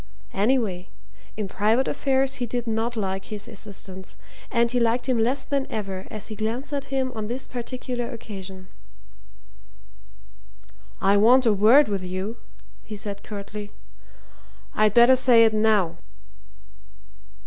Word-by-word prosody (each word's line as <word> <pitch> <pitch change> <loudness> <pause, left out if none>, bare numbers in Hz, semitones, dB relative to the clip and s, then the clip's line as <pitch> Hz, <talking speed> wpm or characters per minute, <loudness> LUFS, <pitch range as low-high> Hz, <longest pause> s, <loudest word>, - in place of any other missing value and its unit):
Anyway, 205 -4 0 0.5
in 210 -2 -2
private 220 +7 +1
affairs, 270 -1 +1
he 245 - -1
did 240 +1 -3
not 225 +1 -1
like 195 -3 -3
his 210 -1 -6
assistant, 190 -2 -8 0.3
and 235 -1 +2
he 250 - +1
liked 235 +2 +1
him 255 -3 +1
less 250 +5 +1
than 275 -1 -1
ever 195 -3 -4
as 215 -2 -6
he 215 - -6
glanced 230 +7 -3
at 280 -1 -2
him 265 -1 -1
on 215 -1 -4
this 245 +4 -2
particular 245 0 -5
occasion. 190 -5 -8 2.3
"I 200 +1 +3
want 245 +5 +5
a 225 - +5
word 225 +9 +6
with 200 -2 -2
you," 185 +5 -4 0.5
he 215 - -8
said 200 -1 -5
curtly. 205 0 -7 1.0
"I'd 215 -1 +2
better 240 +2 +7
say 245 -3 +6
it 220 - +2
now." 210 -6 +2
220 Hz, 135 wpm, -24 LUFS, 200-245 Hz, 2.3 s, better